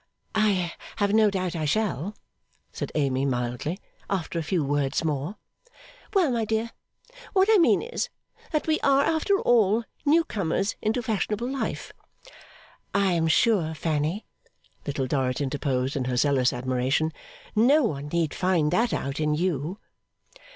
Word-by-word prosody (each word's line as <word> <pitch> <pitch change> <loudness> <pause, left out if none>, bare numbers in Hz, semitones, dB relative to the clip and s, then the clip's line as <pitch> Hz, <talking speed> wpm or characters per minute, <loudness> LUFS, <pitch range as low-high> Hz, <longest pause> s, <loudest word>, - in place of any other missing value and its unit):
'I 200 -6 +1 0.2
have 205 0 +1
no 215 -1 +5
doubt 185 -3 -2
I 155 -2 -2
shall,' 205 +1 -1 0.6
said - - -5
Amy, 135 -3 +1
mildly, 125 +5 -2 0.3
'after 180 -3 -2
a - - -1
few 165 0 0
words 140 +1 0
more.' 155 +4 -2 0.8
'Well, 355 -8 +4
my 235 -2 0
dear, 220 +1 -1 0.6
what 385 0 +4
I 430 - +6
mean 335 - +4
is, 480 +1 -3 0.4
that 305 -3 0
we 315 -1 +1
are, 275 0 +4
after 325 +6 +2
all, 225 -1 +3 0.2
newcomers 210 - +1
into 225 +3 0
fashionable 220 0 -1
life.' 270 +1 -4 1.0
'I 200 -1 +3
am 165 -2 +1
sure, 165 -3 +2
Fanny,' 155 +5 -1 0.6
Little 140 -2 -1
Dorrit 130 -1 0
interposed 135 -2 -1
in 135 -3 -1
her 125 -1 -1
zealous 130 -2 +3
admiration, 130 +5 0 0.4
'no 270 +8 +5
one 145 - -2
need 165 0 0
find 175 -5 +1
that 235 +1 +2
out 140 +2 -3
in 150 -1 +1
you. 165 +1 -1
175 Hz, 145 wpm, -26 LUFS, 145-220 Hz, 1.0 s, I